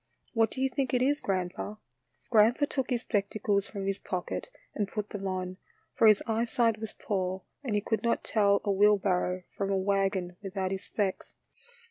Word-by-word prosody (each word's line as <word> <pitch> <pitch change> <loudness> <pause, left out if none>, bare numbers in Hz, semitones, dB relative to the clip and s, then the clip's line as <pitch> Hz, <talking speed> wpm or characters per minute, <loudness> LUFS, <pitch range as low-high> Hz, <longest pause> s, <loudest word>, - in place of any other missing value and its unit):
What 225 -2 +3
do 260 - -4
you - - +4
think 260 -1 -1
it 250 - +3
is, 290 +2 +2
grandpa? 185 +2 -2 0.3
" 120 -1 -43
Grandpa 230 +5 +5
took 265 -3 -2
his 245 -2 0
spectacles 200 -2 0
from 200 -2 -5
his 195 0 -1
pocket 180 - -4 0.2
and 205 - -1
put 210 +1 -4
them 195 -1 -4
on, 185 -1 -3 0.4
for 225 - +5
his 215 -1 +6
eyesight 230 0 +1
was 220 -1 -6
poor 190 -2 -2 0.2
and 235 -6 -1
he 205 - +2
could 220 +1 -1
not 235 -1 +1
tell 200 -2 +3
a 200 - +1
wheelbarrow 190 -2 +3
from 195 -1 -1
a 195 - +2
wagon 190 -2 0
without 190 -1 -3
his 195 0 -3
specs. 200 -1 -3
200 Hz, 185 wpm, -29 LUFS, 190-225 Hz, 0.4 s, his